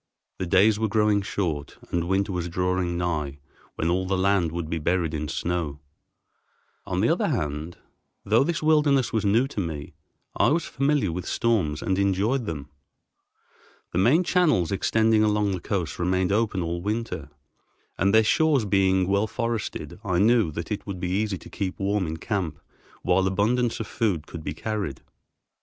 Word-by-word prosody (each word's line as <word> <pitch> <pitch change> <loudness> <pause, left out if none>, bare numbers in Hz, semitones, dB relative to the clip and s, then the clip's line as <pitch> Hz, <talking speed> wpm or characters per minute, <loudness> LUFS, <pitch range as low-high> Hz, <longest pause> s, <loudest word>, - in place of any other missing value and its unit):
The 95 - -2
days 100 +4 +4
were 110 - +1
growing 105 -1 +2
short 85 -8 -3
and 85 -1 0
winter 95 +2 +1
was 90 -2 -3
drawing 90 0 -1
nigh 75 -5 -2 0.4
when 80 - -1
all 95 +1 0
the 95 0 0
land 95 -3 +2
would 85 -1 -4
be 80 +1 -2
buried 85 0 0
in 75 -1 -3
snow. 80 -1 -2 1.1
On - - -1
the - - +3
other - - +2
hand, 75 +3 -3 0.5
though 110 +5 +4
this 165 +1 -2
wilderness 150 -4 +3
was 110 -2 0
new 115 +6 +3
to 110 - -5
me, 80 -6 -4 0.4
I - - +3
was 160 +2 +1
familiar 140 - +1
with 90 +1 -5
storms 95 -11 0
and 95 0 0
enjoyed 100 +6 +1
them. 75 -3 -5 1.2
The 85 - 0
main 135 - +4
channels 160 - +2
extending 110 +2 +3
along 105 -1 +2
the 95 - -2
coast 90 -4 -3
remain 90 +1 +1
open 105 -3 +1
all 85 +1 -3
winter, 105 -7 -3 0.7
and, 95 +1 +2
their 110 +1 +6
shores 145 +1 +3
being 95 -2 +2
well 100 +2 +2
forested, 115 -4 -3
I 90 -4 0
knew 110 -2 +4
that 85 +4 -5
it 105 - -4
would 95 -3 -5
be 90 0 -2
easy 100 0 0
to - - -13
keep 95 -2 -3
warm 100 -2 0
in 80 +1 -4
camp, 95 -3 -2 0.5
while 95 +1 +3
abundance 115 +5 +1
of 115 - -3
food 100 -7 -1
could 80 -2 -8
be 75 - -4
carried. 100 -9 -4
95 Hz, 175 wpm, -25 LUFS, 85-110 Hz, 1.2 s, their